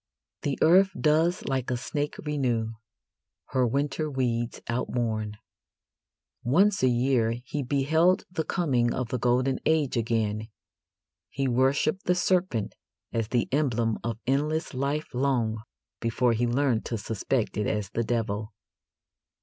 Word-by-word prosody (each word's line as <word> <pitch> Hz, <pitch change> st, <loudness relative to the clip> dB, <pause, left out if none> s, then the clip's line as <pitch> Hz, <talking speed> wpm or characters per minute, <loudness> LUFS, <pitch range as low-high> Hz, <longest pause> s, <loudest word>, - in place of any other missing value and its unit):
The 140 Hz, -2 st, -1 dB
earth 185 Hz, +4 st, +6 dB
does 160 Hz, +3 st, +2 dB
like 130 Hz, -2 st, -1 dB
a 125 Hz, -, 0 dB
snake 145 Hz, +4 st, -3 dB
renew 125 Hz, -7 st, 0 dB, 0.8 s
Her 130 Hz, -2 st, +2 dB
winter 145 Hz, +5 st, -1 dB
weeds 120 Hz, -4 st, -1 dB
outworn. 115 Hz, -3 st, -2 dB, 1.1 s
Once 190 Hz, +11 st, +3 dB
a 130 Hz, -, +4 dB
year 120 Hz, -2 st, +2 dB
he 145 Hz, +2 st, -3 dB
beheld 155 Hz, +7 st, +2 dB
the 160 Hz, -, -1 dB
coming 130 Hz, -9 st, +1 dB
of 125 Hz, -3 st, -2 dB
the 125 Hz, -, -2 dB
golden 125 Hz, +3 st, +2 dB
age 155 Hz, -4 st, +2 dB
again. 110 Hz, -2 st, 0 dB, 0.8 s
He 135 Hz, -1 st, -1 dB
worshipped 135 Hz, +8 st, +1 dB
the 180 Hz, -, +4 dB
serpent 180 Hz, -, +1 dB, 0.4 s
as 115 Hz, -2 st, 0 dB
the 120 Hz, +1 st, 0 dB
emblem 120 Hz, -6 st, +1 dB
of 115 Hz, -2 st, -2 dB
endless 150 Hz, +5 st, 0 dB
life 140 Hz, +4 st, -2 dB
long 120 Hz, -4 st, 0 dB, 0.4 s
before 115 Hz, +1 st, +1 dB
he 120 Hz, +2 st, +1 dB
learned 125 Hz, -1 st, +1 dB
to 115 Hz, -, -2 dB
suspect 110 Hz, +3 st, -2 dB
it 105 Hz, -1 st, 0 dB
as 105 Hz, -2 st, -2 dB
the 115 Hz, -, 0 dB
devil. 110 Hz, -2 st, -2 dB
125 Hz, 135 wpm, -27 LUFS, 115-145 Hz, 1.1 s, earth